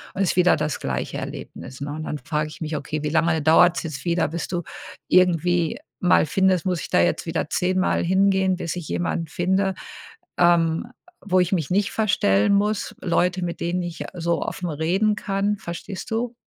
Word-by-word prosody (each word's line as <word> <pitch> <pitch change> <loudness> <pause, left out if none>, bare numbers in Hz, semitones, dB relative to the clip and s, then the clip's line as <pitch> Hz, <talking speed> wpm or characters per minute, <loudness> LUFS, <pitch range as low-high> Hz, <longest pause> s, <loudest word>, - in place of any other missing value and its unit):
und 195 - -1
ist 185 - 0
wieder 180 0 +5
das 150 -1 -2
gleiche 65 -2 -3
Erlebnis, 130 +1 -8
ne? 145 - -4
Und, 155 0 -5
dann 150 - -3
frage 150 0 -2
ich - - -12
mich: 155 0 -3
„Okay, 150 +2 -4
wie 150 - -1
lange 160 0 +2
dauert 170 +2 +5
es - - -2
jetzt 155 -1 -6
wieder, 170 -2 +1
bis 165 +2 -4
du 175 -1 -3 0.5
irgendwie 175 -2 +3 0.2
mal 180 - +4
findest 185 +1 +2
muss 180 -5 0
ich - - -7
da - - +3
jetzt 85 -1 +1
wieder 160 -2 -2
zehnmal 185 +1 +1
hingehen, 190 +1 +2
bis 170 -2 -4
ich 170 - -6
jemanden 165 -1 -2
finde, 190 +3 0 0.6
ähm, 170 +3 +3 0.4
wo 185 -1 +3
ich 180 - 0
mich 160 -6 0
nicht 200 +1 +1
verstellen 195 - +2
muss? 210 +1 0
Leute, 180 0 +1
mit 170 -1 -4
denen 175 +2 -1
ich 170 -1 -6
so 170 -1 -1
offen 180 - -4
reden 180 +8 +1
kann?“ 200 0 -1
Verstehst 185 +4 -7
du? 235 +2 -2
175 Hz, 190 wpm, -23 LUFS, 160-190 Hz, 0.6 s, wieder